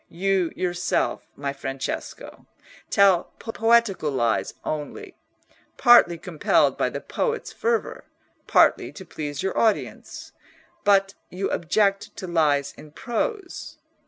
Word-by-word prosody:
You, 185 Hz, -1 st, 0 dB
yourself, 180 Hz, 0 st, -1 dB
my 140 Hz, 0 st, -4 dB
Francesco, 135 Hz, -1 st, -6 dB, 0.4 s
tell 195 Hz, -3 st, +4 dB
poetical 225 Hz, -7 st, +1 dB
lies 120 Hz, -5 st, 0 dB
only; 150 Hz, -1 st, -5 dB, 0.6 s
partly 240 Hz, -9 st, +6 dB
compelled 165 Hz, -2 st, +1 dB
by -, -, 0 dB
the -, -, -6 dB
poet's 470 Hz, -1 st, -3 dB
fervour, 460 Hz, 0 st, -2 dB, 0.4 s
partly -, -, +4 dB
to 190 Hz, -, -10 dB
please 145 Hz, -3 st, -5 dB
your 190 Hz, -, -2 dB
audience; 220 Hz, -2 st, -1 dB, 0.5 s
but 195 Hz, -1 st, +3 dB, 0.2 s
you 190 Hz, +2 st, -3 dB
object 195 Hz, +3 st, 0 dB
to 190 Hz, -, -6 dB
lies 150 Hz, -5 st, +1 dB
in 150 Hz, -1 st, -14 dB
prose. 365 Hz, -, -4 dB
185 Hz, 110 wpm, -24 LUFS, 155-215 Hz, 0.6 s, partly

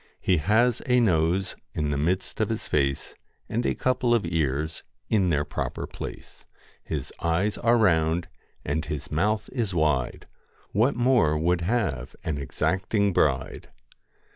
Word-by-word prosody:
He 90 Hz, -, +2 dB
has 110 Hz, +9 st, +2 dB
a 125 Hz, 0 st, +4 dB
nose 90 Hz, -2 st, +2 dB, 0.2 s
in 75 Hz, -1 st, -1 dB
the -, -, 0 dB
midst 90 Hz, +5 st, -1 dB
of -, -, +1 dB
his -, -, -3 dB
face, 70 Hz, -1 st, 0 dB, 0.3 s
And 120 Hz, +2 st, -1 dB
a -, -, 0 dB
couple 130 Hz, -2 st, +2 dB
of 115 Hz, -, 0 dB
ears 80 Hz, -2 st, -1 dB, 0.3 s
in 95 Hz, -5 st, +3 dB
their 75 Hz, -3 st, +1 dB
proper 75 Hz, -, -4 dB
place. -, -, -9 dB, 0.4 s
His -, -, -5 dB
eyes 90 Hz, +6 st, +1 dB
are 120 Hz, +1 st, +4 dB
round 85 Hz, -5 st, +2 dB, 0.4 s
and 75 Hz, +2 st, -1 dB
his 75 Hz, -3 st, -5 dB
mouth 105 Hz, +7 st, +1 dB
is 110 Hz, -8 st, -2 dB
wide, 75 Hz, -6 st, 0 dB, 0.5 s
What 115 Hz, +8 st, +2 dB
more 120 Hz, -11 st, +3 dB
would 85 Hz, +2 st, +1 dB
have 85 Hz, -, -1 dB
an 75 Hz, -3 st, -2 dB
exacting 95 Hz, -, 0 dB
bride -, -, 0 dB
90 Hz, 145 wpm, -26 LUFS, 75-110 Hz, 0.5 s, a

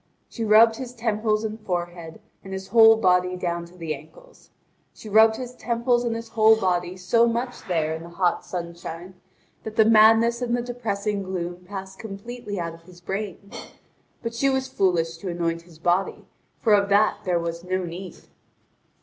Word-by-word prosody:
She 230 Hz, -, -6 dB
rubbed 225 Hz, +1 st, +6 dB
his 250 Hz, -1 st, -7 dB
temples 215 Hz, -2 st, 0 dB
and 220 Hz, 0 st, -4 dB
forehead, 175 Hz, -3 st, -5 dB, 0.2 s
and 195 Hz, -1 st, -8 dB
his 190 Hz, 0 st, -6 dB
whole 225 Hz, -1 st, +7 dB
body 180 Hz, -2 st, +2 dB
down 170 Hz, -1 st, -3 dB
to 175 Hz, +1 st, -17 dB
the 165 Hz, -3 st, -3 dB
ankles. 160 Hz, -, -15 dB, 0.5 s
She -, -, -12 dB
rubbed 220 Hz, +1 st, +5 dB
his 250 Hz, +1 st, -7 dB
temples 240 Hz, 0 st, 0 dB
and 235 Hz, -1 st, -1 dB
his 230 Hz, 0 st, -7 dB
whole 220 Hz, 0 st, +5 dB
body 180 Hz, -2 st, -1 dB
so 230 Hz, +6 st, +3 dB
much 240 Hz, +2 st, -3 dB
there 160 Hz, -3 st, 0 dB
in 160 Hz, -, -6 dB
the 170 Hz, -, -10 dB
hot 175 Hz, +1 st, 0 dB
sunshine 170 Hz, 0 st, -7 dB, 0.5 s
that 220 Hz, -1 st, -8 dB
the 220 Hz, -, +5 dB
madness 225 Hz, +2 st, +5 dB
and 240 Hz, 0 st, 0 dB
the 240 Hz, -, -3 dB
depressing 210 Hz, -4 st, -3 dB
gloom 180 Hz, -2 st, -5 dB
passed 190 Hz, 0 st, -8 dB
completely 215 Hz, 0 st, -7 dB
out 170 Hz, -1 st, -3 dB
of 165 Hz, -, -14 dB
his 175 Hz, +1 st, -16 dB
brain. 200 Hz, +2 st, -6 dB, 0.7 s
But 230 Hz, 0 st, -3 dB
she 275 Hz, +4 st, +1 dB
was 265 Hz, 0 st, 0 dB
foolish 165 Hz, -3 st, 0 dB
to 185 Hz, +2 st, -6 dB
anoint 170 Hz, -1 st, -2 dB
his 160 Hz, -, -16 dB
body, 175 Hz, +4 st, 0 dB, 0.4 s
for 220 Hz, -, +3 dB
of 200 Hz, -1 st, +3 dB
that 205 Hz, +1 st, +3 dB
there 180 Hz, -3 st, +1 dB
was 170 Hz, 0 st, -4 dB
no 185 Hz, +1 st, -2 dB
need. 180 Hz, +2 st, -7 dB
200 Hz, 180 wpm, -24 LUFS, 175-225 Hz, 0.7 s, whole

